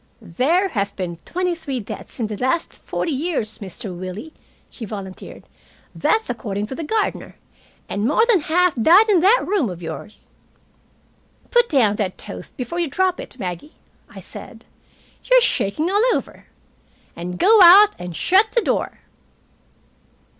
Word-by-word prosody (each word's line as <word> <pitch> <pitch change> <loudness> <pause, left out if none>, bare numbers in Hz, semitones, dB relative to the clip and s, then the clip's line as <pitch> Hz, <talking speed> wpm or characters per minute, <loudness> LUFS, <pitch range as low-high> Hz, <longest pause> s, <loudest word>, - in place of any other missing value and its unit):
"There 325 - +1
have 200 - -2
been 175 -3 -5
twenty 360 0 -1
three 290 -6 -5
deaths 215 - -9
in 230 - 0
it 215 - -6
in 210 - -4
the - - -5
last 260 +6 -1
forty 330 - -3
years, 280 -7 -3
Mr. 195 0 -7
Willie," 185 - -7 0.3
she 240 - -11
volunteered. 195 -3 -8 0.5
"That's 445 0 +1
according 210 -4 -3
to 265 - -6
the 330 - -5
gardener. 430 +7 -2 0.5
And 205 +3 -2
more 320 - +3
than 465 -6 +4
half 355 +3 +2
died 355 - +5
in 390 -4 +5
that 405 +8 +4
room 370 - 0
of 175 -2 -7
yours." 160 +6 -8 1.3
"Put 485 -1 +3
down 220 -8 +2
that 190 -4 -2
toast - - -10
before 270 +7 -4
you 340 - 0
drop 365 +5 0
it, - - -9
Maggie," 180 - -6 0.3
I - - -11
said. - - -9 0.6
"You're - - +6
shaking 310 - 0
all 410 +2 +3
over. - - -6 0.7
And 180 +1 -6
go 430 - +5
out 395 +4 +9
and 180 -1 -7
shut 400 - +3
the 475 - +3
door." - - -2
285 Hz, 160 wpm, -21 LUFS, -, 1.3 s, out